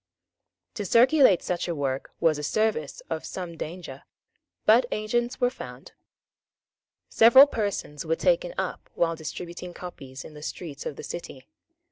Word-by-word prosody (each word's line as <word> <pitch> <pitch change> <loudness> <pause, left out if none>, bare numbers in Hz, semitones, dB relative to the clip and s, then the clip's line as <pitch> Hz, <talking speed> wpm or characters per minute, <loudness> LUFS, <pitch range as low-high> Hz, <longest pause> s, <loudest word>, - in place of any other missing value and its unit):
To 210 - -4
circulate 240 - +5
such 180 0 -2
a 170 - -2
work 135 -2 -2
was 160 -3 +2
a - - -5
service 180 -3 -1
of 160 -1 -3
some 175 -3 -6
danger; 160 -5 -7 0.6
but 240 +3 +6
agents 240 +3 -1
were 245 -1 +2
found. - - -10 1.2
Several 235 +5 +8
persons 200 - -3
were 165 0 0
taken - - +1
up - - -4
while 165 -1 +1
distributing 175 +2 -7
copies 135 -7 -9
in 155 - -11
the 150 - -11
streets 150 -2 -6
of 145 - -5
the - - -9
city. 135 -6 -7
175 Hz, 145 wpm, -26 LUFS, 155-225 Hz, 1.2 s, Several